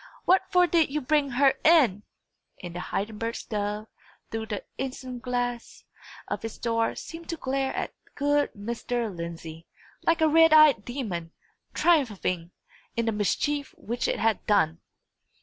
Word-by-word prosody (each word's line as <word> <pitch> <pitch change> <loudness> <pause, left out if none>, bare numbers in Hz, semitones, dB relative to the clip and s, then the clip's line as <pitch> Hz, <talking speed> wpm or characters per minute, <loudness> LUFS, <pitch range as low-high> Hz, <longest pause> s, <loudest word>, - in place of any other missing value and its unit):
What 370 +1 +5
for 360 -2 +5
did 335 -3 +3
you 300 +2 -1
bring 290 +1 +1
her 270 +2 +4
in?" 280 - +5 0.6
And 175 -1 -6
the - - -3
Heidenberg 220 +5 -3
stove, 210 0 -3 0.5
through 225 0 -3
the 210 -3 -4 0.2
isinglass 250 -2 -4 0.4
of - - -4
its 225 - -5
door, 230 -1 0
seemed 330 0 -9
to 335 - -2
glare 270 -1 -1
at - - -3 0.2
good 290 0 +1
Mr. 230 0 -3
Lindsey, 165 -1 -7 0.3
like 330 0 +2
a 315 - +6
red 325 +1 +6
eyed 305 -9 +7
demon, 195 -11 -4 0.4
triumphing 210 - +1 0.5
in 230 - +1
the 225 - +1
mischief 280 +7 -1
which 235 +3 -2
it - - 0
had 225 -1 +1
done! 165 -6 +3
240 Hz, 145 wpm, -27 LUFS, 210-290 Hz, 0.6 s, eyed